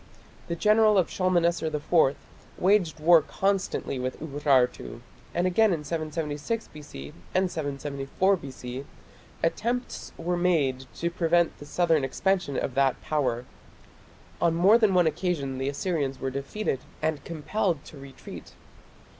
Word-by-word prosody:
the 170 - -2
general 215 +2 +4
of 185 - +2
Shalmaneser 175 -3 +1
IV 150 -1 +2 0.4
waged 180 -5 +2
war 165 +1 +6
constantly 195 -6 -1
with 130 0 -3
Urartu, 140 -5 0 0.3
and 175 - 0
again 205 +4 +4
in 160 -4 -1
776 155 +5 -3
B.C. 70 - -10 0.2
and 185 -1 +2
774 145 +5 -1
B.C. 130 -4 -7 0.6
attempts 240 +9 -2
were 175 +2 -1
made 145 -8 +1
to 170 +1 -2
prevent 170 0 +2
the 145 - -10
southern 165 -3 +2
expansion 175 +2 0
of 130 - -2
that 135 0 +2
Power. 125 -5 -1 1.0
On 170 -1 +3
more 195 +7 +6
than 210 -5 +3
one 180 -1 +5
occasion 150 -5 -1
the 135 +1 -1
Assyrians 140 -3 -2
were 135 - -2
defeated 140 +3 -2 0.2
and 155 -3 -1
compelled 170 0 -2
to 150 - -12
retreat. 135 -1 -11
160 Hz, 130 wpm, -27 LUFS, 140-180 Hz, 1.0 s, war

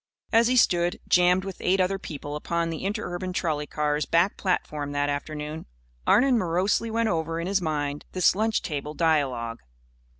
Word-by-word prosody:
As 230 +1 +5
he 255 - +2
stood, 175 -7 +3
jammed 180 +1 +4
with 195 -2 -6
eight 190 +1 +2
other 190 +1 +1
people 145 -4 -6
upon 170 +2 -1
the 165 - -5
interurban 185 -3 -3
trolley 155 -5 -1
car's 150 0 -1
back 170 +4 +2
platform 150 -6 -2
that 145 0 0
afternoon, 150 - -4 0.4
Arnon 250 +1 +5
morosely 185 +5 +1
went 230 0 0
over 165 -1 -1
in 170 - -3
his 190 +1 +1
mind 145 -3 -2
this 185 -2 +4
lunch 220 +3 0
table 150 -1 -4
dialogue. 130 -8 0
170 Hz, 165 wpm, -26 LUFS, 150-190 Hz, 0.4 s, As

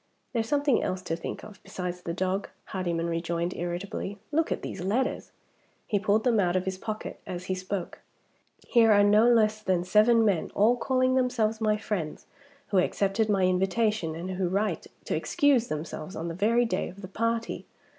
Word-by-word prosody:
"There's 225 -2 0
something 285 -3 +2
else 185 0 -2
to 165 - -2
think 165 - -6
of 210 -1 -12
besides 180 -1 -5
the 170 - -4
dog," 185 +3 -1 0.2
Hardyman 170 -3 -2
rejoined 170 +1 -2
irritably. 185 +3 -4
"Look 320 +2 +1
at - - -2
these 190 - -5
letters!" 235 +8 -1 0.6
He 205 - 0
pulled 205 +2 +2
them 235 -4 +3
out 180 -2 +2
of 185 0 0
his 190 0 -3
pocket 215 0 -5
as 180 -1 -5
he 185 - -1
spoke. 185 0 -4 0.7
"Here 230 -3 +5
are 205 -1 +6
no 210 +3 +5
less 215 -2 +3
than 185 -4 +1
seven 220 +4 +4
men, 195 -6 +1
all 220 +4 +4
calling 255 +1 +1
themselves 235 -4 +1
my 215 -1 +2
friends, 195 -8 -4 0.4
who 195 - +3
accepted 200 +4 +1
my 195 -2 +2
invitation, 190 -1 +1
and 175 +3 -5
who 185 -1 -1
write 200 +4 -1 0.2
to - - -1
excuse 275 -5 +2
themselves 155 +3 -5
on 165 +1 -4
the - - -4
very 225 +7 +2
day 230 - -1
of 195 +2 -12
the - - -5
party. 230 0 -2
200 Hz, 185 wpm, -27 LUFS, 180-225 Hz, 0.7 s, are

